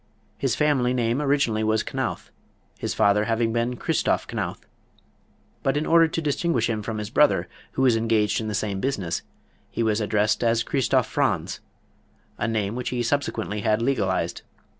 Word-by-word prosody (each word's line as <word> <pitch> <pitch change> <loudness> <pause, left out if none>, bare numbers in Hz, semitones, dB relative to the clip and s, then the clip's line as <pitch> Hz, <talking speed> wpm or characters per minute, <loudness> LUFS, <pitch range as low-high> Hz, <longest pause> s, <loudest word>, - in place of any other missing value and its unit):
His - - 0
family 130 -5 +2
name 120 +2 +1
originally 140 -7 +1
was 110 0 +1
Knauth, - - -4 0.5
his - - -3
father 105 +1 +3
having 115 0 0
been 120 +1 0
Christoph - - 0
Knauth. - - -4 1.0
But 135 +2 +1
in 150 - 0
order 165 0 +5
to 165 +1 -3
distinguish 145 -5 +1
him 110 -1 -2
from 110 +1 -4
his 105 +1 -5
brother, 125 -13 +3 0.3
who 135 - 0
was 125 -3 +5
engaged 115 -1 +1
in 110 - -4
the 105 - -2
same 100 -2 -2
business, 95 -9 -2 0.5
he 115 - -2
was 110 0 +1
addressed 105 +1 +1
as 115 0 +2
Christoph 135 +1 +1
Franz, - - -1 0.8
a - - 0
name 110 -2 -1
which 125 +1 -3
he 120 -1 -1
subsequently 110 -5 -1
had 105 +1 +2
legalized. 100 -9 0
115 Hz, 165 wpm, -24 LUFS, 105-130 Hz, 1.0 s, order